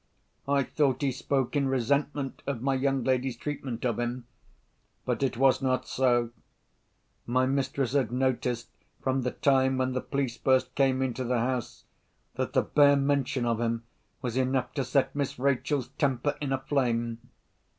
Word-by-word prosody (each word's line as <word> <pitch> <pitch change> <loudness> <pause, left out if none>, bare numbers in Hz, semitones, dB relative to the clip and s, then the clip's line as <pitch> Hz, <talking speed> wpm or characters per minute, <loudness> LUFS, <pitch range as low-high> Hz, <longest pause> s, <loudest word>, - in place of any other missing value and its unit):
I 140 0 +3
thought 135 -2 0
he 135 - +2
spoke 135 +1 -1
in 140 -1 +2
resentment 135 +2 0
of 130 -4 -3
my 135 0 +2
young 135 -1 +1
lady's 130 -1 0
treatment 130 -4 -4
of 120 -3 0
him. 120 +1 -3 0.8
But - - -1
it 130 -3 0
was 135 +1 +4
not 130 -1 0
so. 120 -3 +2 1.0
My 130 +2 +2
mistress 135 -1 -1
had 130 -6 +1
noticed, 125 -1 -1 0.3
from 130 0 +1
the 125 - 0
time 130 0 +2
when 130 0 0
the 130 - -1
police 135 -4 -2
first 130 +1 +2
came 135 -1 +2
into 130 -1 -2
the 125 0 0
house, 125 0 -2 0.5
that - - -3
the - - +3
bare 145 -1 +5
mention 140 -2 +1
of 115 -1 0
him 115 0 -1 0.4
was 125 -1 -2
enough 130 -1 0
to 140 - -1
set 130 +3 +1
Miss 140 -1 -2
Rachel's 135 0 0
temper 140 0 +1
in 140 -2 -2
a 135 - +2
flame. 120 -4 -1
130 Hz, 165 wpm, -28 LUFS, 125-140 Hz, 1.0 s, bare